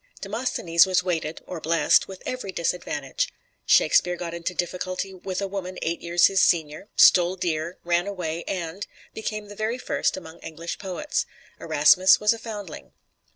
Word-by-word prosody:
Demosthenes 195 -6 +2
was 185 -1 +2
weighted 165 -3 -2
(or 175 -3 -7
blessed) 165 +2 +3
with 190 -1 -10
every 250 -6 -4
disadvantage; 180 - -2 0.4
Shakespeare 180 0 +4
got 170 -1 -6
into 170 +1 -4
difficulty 185 +2 -3
with 185 +1 -4
a - - -1
woman 185 -1 -5
eight 170 +1 -2
years 170 0 +3
his 195 -1 +3
senior, 160 +3 +1
stole 180 0 +6
deer, 170 -1 -2
ran 175 +2 +1
away, 170 -4 -4
and 180 +1 -4 0.3
became 215 -1 -5
the 205 - -10
very 220 +3 -2
first 255 - -1
among 160 -3 -10
English 165 +1 -7
poets; 195 +10 -3 0.3
Erasmus 185 +1 +5
was 210 +1 +3
a 230 - -8
foundling. 205 -8 -8
180 Hz, 155 wpm, -25 LUFS, 170-195 Hz, 0.4 s, stole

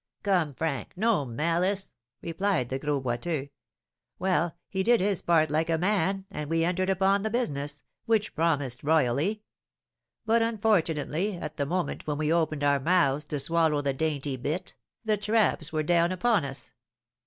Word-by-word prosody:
"Come, 175 -8 +1
Frank, 150 -3 -3
no 210 -6 +1
malice!" 170 - -1 0.3
replied 170 -6 0
the 130 - -2
Gros 145 -1 -1
Boiteux. 135 +4 -2 0.7
"Well, 180 -3 0
he 190 - -2
did 235 +4 +4
his 195 -1 0
part 160 -3 +3
like 160 +2 +1
a 165 - +2
man, 195 +1 0
and 150 -5 -5
we 165 0 +2
entered 185 +2 0
upon 195 +1 +2
the 220 - -1
business, 145 - -3 0.2
which 220 -2 +1
promised 145 -7 0
royally; 160 - +1 0.8
but, 225 +1 +3
unfortunately, 200 -5 0
at - - -7
the 140 -2 -1
moment 180 0 -2
when 150 -1 -1
we 155 +1 +1
opened 155 -3 0
our 140 -1 +3
mouths 150 -2 +2
to 150 - -3
swallow 160 0 +1
the 140 -1 0
dainty 145 -2 -2
bit, 150 +8 -4 0.3
the 215 -1 +2
'traps' 205 -7 +1
were 155 -1 0
down 170 +2 +3
upon 200 -2 +2
us. 135 0 -6
165 Hz, 160 wpm, -27 LUFS, 145-195 Hz, 0.8 s, did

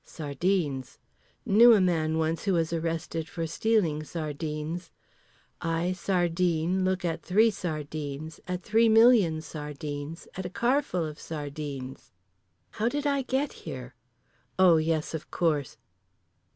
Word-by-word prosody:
Sardines. 150 -2 -2 0.5
Knew 230 +3 +7
a - - +4
man 160 -4 +1
once 160 +2 -1
who 195 - +2
was 165 -1 +1
arrested 165 -1 -3
for 165 -1 -3
stealing 170 -3 +1
sardines. 155 +1 -4 0.7
I, 165 +1 0
sardine, 175 -1 +1
look 185 0 0
at 165 -1 -2
three 220 +5 +4
sardines, 155 -4 -5
at 180 -1 -3
three 225 +3 +4
million 220 -8 +5
sardines, 150 +1 -6
at 190 - -4
a 180 - -4
carful 235 - 0
of 150 -1 -7
sardines. 145 -3 -6 0.6
How 225 +2 0
did 290 +3 -3
I 280 -1 +2
get 265 +2 -1 0.2
here? 125 -1 -7 0.6
Oh 180 -3 +6
yes 155 0 0
of 160 - -6
course. 150 -6 0
165 Hz, 125 wpm, -28 LUFS, 155-190 Hz, 0.7 s, Knew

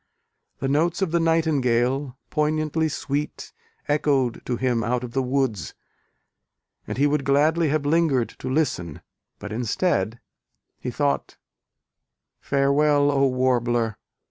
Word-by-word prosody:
The 135 - -2
notes 165 +7 +1
of 180 - -1
the 170 - +2
nightingale, 135 -5 +1
poignantly 155 +1 0
sweet, 145 0 -4 0.3
echoed 145 -5 +1
to 125 - 0
him 120 -3 0
out 125 +1 -1
of 120 - -6
the 135 - +1
woods, 130 -7 -1 1.1
and - - -4
he 140 - +3
would 145 -1 +1
gladly 155 +4 +3
have 150 0 0
lingered 145 -6 +2
to 130 - -5
listen; 130 - -1 0.3
but, 105 +1 -7
instead, 115 - 0 0.6
he - - -4
thought 70 -1 -1 1.0
Farewell, 145 +1 +2
O 140 -1 +3
Warbler! 120 -4 0
140 Hz, 120 wpm, -24 LUFS, 125-150 Hz, 1.1 s, he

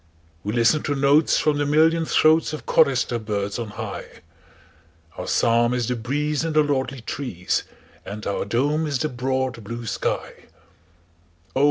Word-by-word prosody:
We 105 - -2
listen 120 +6 +3
to 145 - -1
notes 140 +3 +4
from 150 -1 +1
the 145 - +1
million 160 +2 +3
throatsOf 155 0 +2
chorister 130 -6 +2
birds 105 -1 -3
on 115 - -3
high, 105 - -8 0.9
Our - - -6
psalm 120 +1 +2
is 120 -3 -1
the 125 - 0
breeze 145 +6 -1
in 165 -1 -2
the 155 0 +5
lordly 135 -3 -1
trees, 110 -8 -3 0.4
And 105 +1 -7
our 100 - -1
dome 145 +9 0
is 140 -3 0
the 155 +5 -1
broad 130 -1 -2
blue 115 +3 -6
sky, 105 - -3 1.1
Oh! - - +1
130 Hz, 155 wpm, -23 LUFS, 115-150 Hz, 1.1 s, the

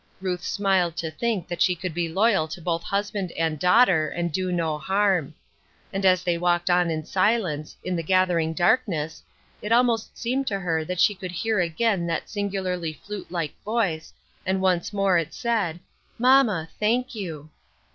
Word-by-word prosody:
Ruth 185 -1 -2
smiled 190 -4 +1
to 160 -1 -3
think 205 +1 -2
that 175 - -5
she 180 - +4
could 180 0 -5
be 170 0 -1
loyal 195 -2 +2
to 160 +3 -7
both 170 0 -1
husband 200 -1 -2
and 160 -2 -1
daughter 180 -4 +4
and 170 -1 -2
do 185 +3 -1
no 165 -3 -1
harm. 190 -2 +1 0.6
And 195 0 +1
as 185 -1 +4
they 175 -1 0
walked 175 0 +1
on 175 -1 +3
in 155 -1 -3
silence, 185 -7 0
in 185 - -2
the 165 - -1
gathering 175 -2 +2
darkness, 170 -5 +1 0.4
it 210 - -5
almost 235 -2 +2
seemed 255 +3 -1
to 200 - 0
her 165 -3 -1
that 180 +1 -4
she 210 - +5
could 185 -2 -7
hear 210 +4 -1
a<rain 175 +1 0
that 165 -1 -3
singularly 190 -5 -2
flute 205 +3 -8
like 170 -5 -2
voice, 200 -8 -1 0.3
and 190 0 0
once 185 -2 +1
more 195 -3 +2
it 165 - -5
said, 205 -8 -1 0.4
"Mamma, 245 -9 +4
thank 240 +5 +1
you." 160 -8 -6
180 Hz, 175 wpm, -25 LUFS, 165-205 Hz, 0.6 s, she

